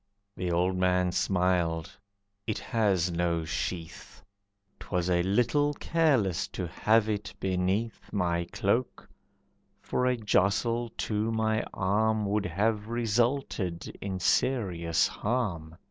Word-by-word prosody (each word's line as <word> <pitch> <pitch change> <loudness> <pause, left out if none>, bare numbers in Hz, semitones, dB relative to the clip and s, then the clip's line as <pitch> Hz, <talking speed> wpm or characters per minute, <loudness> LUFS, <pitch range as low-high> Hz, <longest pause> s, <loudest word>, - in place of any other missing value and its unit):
The 90 -1 -2
old 90 +2 +1
man 90 0 +2
smiled, 90 -3 +1 0.6
"It 110 - -1
has 100 -7 +1
no 85 -1 0
sheath, 80 +6 -5 0.6
'Twas 90 -1 -1
a 85 -1 +3
little 125 +10 +2
careless 135 - +1
to 90 - -5
have 110 +5 +2
it 105 -2 -2
beneath 95 +4 -1
My 85 -3 0
cloak, 105 +8 -1 0.7
for 125 - -1
a 125 -1 +2
jostle 110 +3 +1
to 110 +1 -1
my 110 -1 +1
arm 105 +3 +1
Would 105 0 0
have 105 +5 0
resulted 115 -5 -1
in 95 -2 -3
serious 90 -6 +1
harm. 95 -9 -2
100 Hz, 115 wpm, -29 LUFS, 90-110 Hz, 0.7 s, a